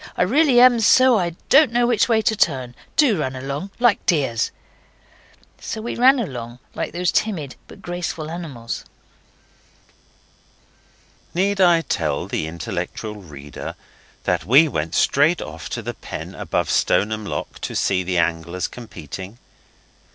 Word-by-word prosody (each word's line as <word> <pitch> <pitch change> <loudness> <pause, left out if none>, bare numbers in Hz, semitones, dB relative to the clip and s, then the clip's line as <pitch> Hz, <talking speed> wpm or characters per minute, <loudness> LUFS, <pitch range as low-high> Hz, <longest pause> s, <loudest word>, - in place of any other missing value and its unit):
I - - +3
really 265 - +4
am 245 -1 +7
so 250 +1 +5
I 170 -2 -2
don't 280 -3 +6
know 240 +1 +2
which 240 -1 +2
way 220 -1 +3
to 220 - +2
turn. 130 - 0 0.2
Do 245 - +4
run 130 -3 -2
along, 140 +8 -5
like 240 -4 +3
dears.' 135 - +1 1.1
So 220 - -5
we 230 +2 -4
ran 260 +3 +5
along 125 - -5 0.2
like - - -3
these 175 0 0
timid 160 - -1
but - - -14
graceful 175 -3 -4
animals. 140 -9 -6 2.5
Need 195 +2 +1
I 175 -2 +5
tell 75 - -2
the 80 - -3
intellectual 85 +6 -5
reader 75 -7 -9 0.5
that 90 -3 0
we 135 - +6
went 80 - -3
straight 150 +5 +3
off 80 0 -7
to - - -4
the - - -4
pen - - -8
above - - -2
Stoneham 110 +1 +1
Lock 100 - -5
to - - -4
see 95 -1 +1
the 90 0 -2
anglers 85 +2 -1
competing? 95 - -9
150 Hz, 145 wpm, -21 LUFS, -, 2.5 s, am